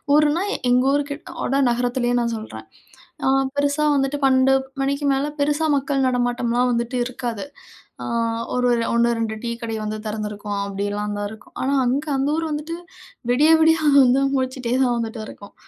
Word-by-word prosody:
ஊருனா 300 Hz, +4 st, +3 dB, 0.3 s
எங்க 250 Hz, +1 st, +4 dB
ஊருக்குகிட்டோட 285 Hz, -1 st, -2 dB
நகரத்திலேயே 245 Hz, 0 st, 0 dB
நான் 235 Hz, 0 st, -1 dB
சொல்றேன். 215 Hz, 0 st, -9 dB, 0.6 s
அ -, -, +3 dB, 0.3 s
பெருசா 285 Hz, +1 st, +1 dB
வந்துட்டு 275 Hz, +1 st, 0 dB
12 265 Hz, 0 st, +4 dB, 0.3 s
மணிக்கு 280 Hz, +1 st, -1 dB
மேலே, 270 Hz, +2 st, 0 dB
பெருசா 295 Hz, +2 st, +1 dB
மக்கள் 275 Hz, -1 st, 0 dB
நடமாட்டம்லாம் 245 Hz, 0 st, +1 dB
வந்துட்டு 235 Hz, +2 st, -1 dB
இருக்காது. 245 Hz, -3 st, -5 dB, 0.6 s
ஆ -, -, -5 dB, 0.5 s
ஒரு 250 Hz, 0 st, +1 dB
ஒரு 235 Hz, -1 st, +2 dB
1, 235 Hz, 0 st, +3 dB
2 220 Hz, -1 st, -2 dB
டீ 235 Hz, -, -2 dB
கடை 225 Hz, -1 st, -3 dB
வந்து 215 Hz, 0 st, -3 dB
திறந்திருக்கும், 210 Hz, -1 st, -4 dB
அப்படிலாம் 205 Hz, +1 st, -3 dB
தான் 205 Hz, 0 st, -2 dB
இருக்கும். 220 Hz, -1 st, -14 dB
ஆனா 270 Hz, +2 st, +1 dB
அங்க 270 Hz, +5 st, 0 dB
அந்த 270 Hz, +1 st, 0 dB
ஊர் 325 Hz, -, -1 dB
வந்துட்டு 300 Hz, +3 st, -4 dB, 0.6 s
விடிய 295 Hz, +6 st, +4 dB
விடிய 320 Hz, 0 st, +5 dB, 0.3 s
வந்து 255 Hz, +2 st, +3 dB
முழிச்சுட்டே 255 Hz, -2 st, -2 dB
தான் 245 Hz, -2 st, +1 dB
வந்துட்டு 225 Hz, -1 st, -4 dB
இருக்கும். 200 Hz, -, -12 dB
250 Hz, 155 wpm, -22 LUFS, 230-280 Hz, 0.6 s, விடிய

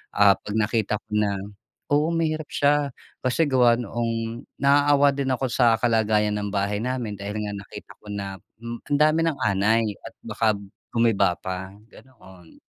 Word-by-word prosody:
ah, 100 Hz, -1 st, +7 dB
pag 105 Hz, -, -7 dB
nakita 110 Hz, -1 st, +1 dB
ko -, -, -53 dB
na 105 Hz, -1 st, +2 dB, 0.6 s
oo, 150 Hz, +2 st, +3 dB
mahirap 155 Hz, -2 st, -1 dB
siya. 145 Hz, 0 st, +2 dB, 0.3 s
Kasi 130 Hz, +5 st, +1 dB
gawa 125 Hz, -3 st, +5 dB
noong 115 Hz, 0 st, -3 dB, 0.2 s
naaawa 145 Hz, 0 st, +5 dB
din 140 Hz, -1 st, -2 dB
ako 130 Hz, +1 st, -1 dB
sa 120 Hz, -2 st, +4 dB
kalagayan 110 Hz, -3 st, +2 dB
ng 105 Hz, -, -3 dB
bahay 100 Hz, +1 st, 0 dB
namin 120 Hz, -2 st, -3 dB
dahil 100 Hz, +1 st, -5 dB
nga 105 Hz, -, -4 dB
nakita 100 Hz, -2 st, -10 dB
ko 105 Hz, -, -19 dB
na, 100 Hz, -1 st, -5 dB, 0.3 s
hmm, 115 Hz, 0 st, -5 dB
ang 145 Hz, -, +2 dB
dami 155 Hz, +1 st, +4 dB
ng 155 Hz, -, 0 dB
anay 105 Hz, +3 st, +2 dB, 0.2 s
at 115 Hz, -, -9 dB
baka 110 Hz, 0 st, -1 dB, 0.5 s
gumiba 110 Hz, -6 st, +3 dB
pa, 95 Hz, +1 st, -5 dB, 0.2 s
ganoon. 95 Hz, -9 st, -17 dB
115 Hz, 160 wpm, -24 LUFS, 105-130 Hz, 0.6 s, ah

